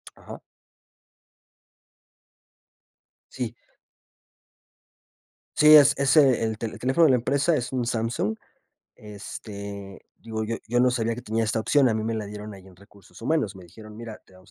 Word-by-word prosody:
Ajá. - - -11 2.9
Sí. 120 -2 -5 2.0
Sí, 150 0 +8
es 145 -1 +7
ese, 135 -3 +4
el 110 -1 -2
el 115 -2 -6
teléfono 135 +6 +3
de 140 - +5
la - - +5
empresa 140 +6 +1
es 120 -2 -3
un 125 -2 -2
Samsung, 115 -2 -2 0.6
este, 100 -1 -9 0.2
digo, 110 -1 -6
yo 115 +1 -3
yo 120 +2 +1
no 125 0 +4
sabía 115 -1 -1
que 125 - -8
tenía 115 -1 -2
esta 110 +1 -1
opción. 135 +2 +3
A - - 0
mí 110 - -2
me 115 0 -2
la 110 -1 -4
dieron 105 0 -8
ahí 95 -1 -15
en 95 - -16
Recursos 100 +3 -19
Humanos. 135 -5 -1
Me 95 -2 -13
dijeron: 105 +5 -14
"Mira, 115 -1 -9
te - - -24
vamos 95 0 -20
115 Hz, 155 wpm, -25 LUFS, 105-125 Hz, 2.9 s, Sí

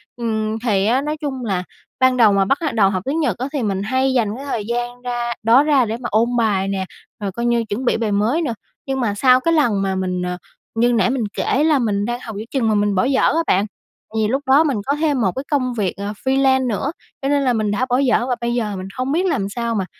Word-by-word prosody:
Ừm, 220 -2 -2
thì 205 -5 +1
á, 250 +5 +2
nói 300 +1 -3
chung 265 -4 -4
là 190 -4 -1 0.4
ban 260 -1 +4
đầu 215 -4 +5
mà 195 -1 +3
bắt 275 - 0
lại 300 -7 -1
đầu 200 -4 +4
học 185 -1 -2
tiếng 290 +4 -1
Nhật 300 - 0
á 255 - -3
thì 275 - -1
mình 195 -2 -1
hay 260 +3 +1
dành 225 -4 +1
cái 275 +2 -8
thời 230 -6 -2
gian 240 +1 -3
ra 240 -1 -2
đó 235 +5 +5
ra 285 -5 +3
để 225 +1 -3
mà 240 - -5
ôn 235 +3 +2
bài 200 -4 +1
nè, 190 -1 -2 0.3
rồi 200 -2 -3
coi 235 +4 -4
như 235 -1 +2
chuẩn 230 +5 -3
bị - - +2
bài 225 -2 -1
mới 220 +11 +1
nữa, 275 -8 -1 0.3
nhưng 270 -1 -2
mà 225 -5 0
sau 255 +3 +5
cái 330 +5 +1
lần 235 -11 +2
mà 190 -1 -1
mình, 180 -1 -2
ờ, 180 0 -3 0.4
như 240 +2 +3
nãy 220 -1 +2
mình 255 -3 -1
kể 285 - 0
là 305 -3 +3
mình 205 -3 0
đang 240 +1 -3
học 225 -4 -8
giữa 215 - -5
chừng 250 -5 +1
mà 215 - +2
mình 205 -1 +1
bỏ 185 - +2
dở 270 0 +2
á 330 +1 +2
bạn, 195 +3 +3 0.5
vì 215 -1 +1
lúc 270 +5 0
đó 275 +4 +6
mình 280 -8 0
có 280 - +1
thêm 295 -5 0
một 190 -3 +2
cái 265 - -3
công 255 -3 +1
việc 200 -6 -1
ờ 200 +1 -4
freelance 265 -1 +3
nữa, 240 +6 -1 0.3
cho 275 - -1
nên 285 0 +2
là 250 - +2
mình 215 -2 0
đã 245 +5 0
bỏ 245 - +2
dở 255 -3 +2
và 250 - +1
bây 235 0 -1
giờ 220 -4 -1
mình 185 0 -6
không 255 +2 -1
biết 350 +5 +1
làm 265 - 0
sao 235 +1 -2
mà, 195 -3 -1
240 Hz, 275 wpm, -20 LUFS, 210-265 Hz, 0.5 s, đó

